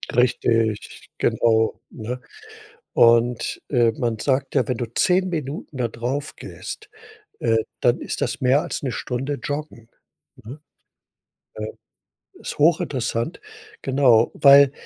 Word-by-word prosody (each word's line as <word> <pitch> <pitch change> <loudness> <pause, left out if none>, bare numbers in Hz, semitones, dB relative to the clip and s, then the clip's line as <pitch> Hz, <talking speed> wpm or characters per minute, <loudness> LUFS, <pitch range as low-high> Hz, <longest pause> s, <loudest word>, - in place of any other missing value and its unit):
Richtig 115 -3 0
genau, 110 -1 +1
ne? 125 +3 -6 0.7
Und, 120 0 +3
äh, 120 -4 +3
man 115 -1 -2
sagt 135 +2 -1
ja, - - +2
wenn 125 - -1
du 120 - -3
10 185 +6 +2
Minuten 150 -3 -5
da 120 -2 0
drauf 125 +6 -4
gehst, 425 -1 -9 0.5
äh, 115 -1 +2 0.2
dann 120 0 +2
ist - - -5
das 130 -5 -2
mehr 130 +3 +4
als - - -4
'ne 135 - -2
Stunde 135 +3 -3
joggen, 145 -6 -5 0.5
ne? 130 +7 -11 1.0
Ja. 110 - -3 0.7
Ist - - -6
hochinteressant, 145 -4 +1 0.4
genau, 130 -4 +4
weil, 140 -1 +7
125 Hz, 120 wpm, -22 LUFS, 115-140 Hz, 1.0 s, weil